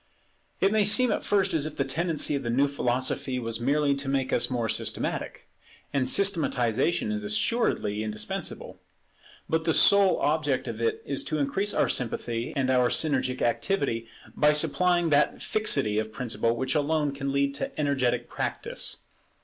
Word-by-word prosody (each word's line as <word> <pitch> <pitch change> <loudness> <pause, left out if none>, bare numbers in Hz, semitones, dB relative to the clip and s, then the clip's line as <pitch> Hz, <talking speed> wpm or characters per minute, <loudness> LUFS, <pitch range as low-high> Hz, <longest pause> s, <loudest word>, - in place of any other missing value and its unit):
It 195 - +3
may 215 -1 +3
seem 240 +4 +4
at - - -2
first 200 -2 +1
as 155 -2 0
if 155 - -9
the 140 - +1
tendency 160 +3 0
of 140 - -2
the 120 - -4
new 135 +4 +2
philosophy 130 -1 -1
was 115 -2 -3
merely 140 +3 +1
to 140 0 -4
make 135 -1 -1
us - - +2
more 120 -3 -1
systematic. - - -2 0.5
And 130 -3 +1
systematization 150 - +1
is 105 0 -3
assuredly 105 - 0
indispensable; 110 -1 -5 0.7
but 160 0 -1
the 160 - +2
sole 200 -2 +5
object 145 -3 0
of 115 -1 -5
it 115 - -1
is 140 -1 -2
to 155 - -2
increase 190 +9 -1
our - - +2
sympathy 120 -1 -2
and 130 -2 0
our 125 -1 +3
synergic 130 -4 +1
activity 120 - -1 0.3
by 150 0 +4
supplying 170 +3 +2
that 145 +1 +2
fixity 140 - +1
of 110 0 -4
principle 115 -1 -1
which 130 +2 -1
alone 150 0 0
can 140 0 -4
lead 140 0 0
to 140 - -5
energetic 125 -5 0
practice. - - -4
140 Hz, 165 wpm, -26 LUFS, 120-155 Hz, 0.7 s, sole